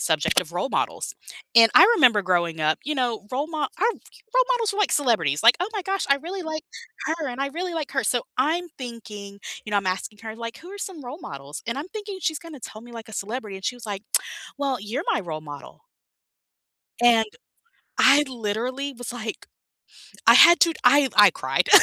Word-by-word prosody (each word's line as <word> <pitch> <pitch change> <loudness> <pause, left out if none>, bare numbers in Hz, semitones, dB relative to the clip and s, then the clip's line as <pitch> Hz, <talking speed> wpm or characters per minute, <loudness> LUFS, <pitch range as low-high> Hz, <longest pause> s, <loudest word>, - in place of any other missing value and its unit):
subject 160 -1 +2
of 170 -2 -9
role 180 +10 -2
models - - -2 0.4
and 230 -1 +8
I - - +10
remember 230 - +5
growing 170 -3 0
up, 155 +1 +2
you 305 - -2
know, 240 -6 -2
role 275 +4 -1
mo 315 -1 -6
our 290 - +1 0.2
role - - -2
models 460 -4 0
were, 400 - -6
like, 415 - +2
celebrities 170 - +1
like, 230 +2 +7
"Oh 365 - 0
my 405 - -2
gosh, 390 +2 -2
I 275 - +5
really 350 +7 -6
like 315 -1 -4 0.4
her 315 -3 -2
and 250 +2 -6
I 275 - -1
really 345 +4 -4
like 310 -3 -4
her." 270 - 0
So 245 -2 +1 0.2
I'm 330 +6 +1
thinking 210 -5 -9 0.3
You 215 - -6
know, 205 - +1
I'm 195 - -4
asking 185 +3 -3
her 220 -1 -6
like, 230 0 -6
"Who 355 +3 -12
are 405 - -9
some 350 -8 -7
role 255 +6 -7
models?" 140 +2 -8
And 235 +2 -2
I'm 315 +6 -6
thinking 415 -2 -7
she's 315 -2 -1
gonna 330 -4 -11
tell 215 - -9
me, 240 - -13
like, 230 -1 -9
a - - -12
celebrity 210 -1 -5
and 190 - -11
she 250 - -2
was 240 - -12
like, 200 -2 -5 0.6
"Well, 275 -3 -1
you're 235 - -4
my - - 0
role 155 -4 -6
model" 145 -2 -11 1.2
and 230 -2 +5 0.7
I 290 +2 +6
literally 250 +4 -3
was 245 0 -7
like, 225 -2 -6 0.8
I - - +9
had 345 0 +9
to 335 -1 +5
I 285 -1 +5
I 205 -2 +8
cried. 135 -3 -1
245 Hz, 210 wpm, -24 LUFS, 205-310 Hz, 1.2 s, I